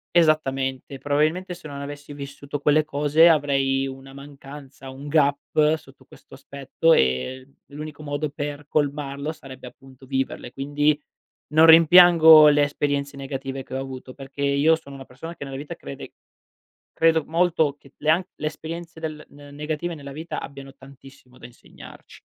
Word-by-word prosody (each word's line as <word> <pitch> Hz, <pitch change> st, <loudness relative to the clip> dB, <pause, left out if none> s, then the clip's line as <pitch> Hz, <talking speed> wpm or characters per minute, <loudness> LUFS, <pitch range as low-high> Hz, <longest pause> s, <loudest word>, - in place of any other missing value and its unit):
Esattamente, 135 Hz, -5 st, +1 dB
probabilmente 155 Hz, +6 st, -1 dB
se 170 Hz, -3 st, -12 dB
non 140 Hz, -1 st, -8 dB
avessi 145 Hz, +1 st, -8 dB
vissuto 140 Hz, 0 st, -7 dB
quelle 150 Hz, +2 st, +2 dB
cose 150 Hz, +3 st, +4 dB
avrei 135 Hz, -3 st, +1 dB
una 135 Hz, 0 st, -9 dB
mancanza, 140 Hz, -1 st, -12 dB
un 135 Hz, +2 st, -10 dB
gap 150 Hz, +1 st, +2 dB
sotto 135 Hz, -4 st, -18 dB
questo -, -, -17 dB
aspetto 140 Hz, +4 st, -1 dB
e 95 Hz, -, 0 dB, 0.2 s
l'unico 150 Hz, +1 st, -9 dB
modo 145 Hz, +1 st, -3 dB
per 145 Hz, 0 st, -6 dB
colmarlo 145 Hz, 0 st, -2 dB
sarebbe 130 Hz, -4 st, -11 dB
appunto 135 Hz, +1 st, -18 dB
viverle, 130 Hz, -2 st, -4 dB
quindi, 145 Hz, +2 st, 0 dB, 0.5 s
non 160 Hz, +1 st, +6 dB
rimpiango 165 Hz, -1 st, +8 dB
le 145 Hz, 0 st, +4 dB
esperienze 145 Hz, -1 st, -2 dB
negative 135 Hz, 0 st, -6 dB
che 130 Hz, -, -17 dB
ho 135 Hz, -, -2 dB
avuto 130 Hz, -1 st, -8 dB
perché 135 Hz, +1 st, -9 dB
io 140 Hz, +3 st, +3 dB
sono 140 Hz, -3 st, -12 dB
una 135 Hz, -, -10 dB
persona 165 Hz, +7 st, -10 dB
che 170 Hz, -, -8 dB
nella 135 Hz, -1 st, -7 dB
vita 145 Hz, +2 st, -7 dB
crede 70 Hz, -, -10 dB, 0.8 s
credo 165 Hz, -1 st, +2 dB
molto 160 Hz, -3 st, +1 dB
che 140 Hz, -, -20 dB
le 155 Hz, -, +1 dB
an 165 Hz, +4 st, +3 dB
le 155 Hz, -, -5 dB
esperienze 165 Hz, +2 st, -7 dB
del 155 Hz, -1 st, -6 dB
n 145 Hz, 0 st, -15 dB
negative 155 Hz, +4 st, -4 dB
nella 140 Hz, -3 st, -10 dB
vita 160 Hz, +4 st, -6 dB
abbiano 135 Hz, -1 st, -10 dB
tantissimo 135 Hz, -2 st, -17 dB
da -, -, -11 dB
insegnarci. 120 Hz, -, -15 dB
145 Hz, 155 wpm, -23 LUFS, 135-155 Hz, 0.8 s, rimpiango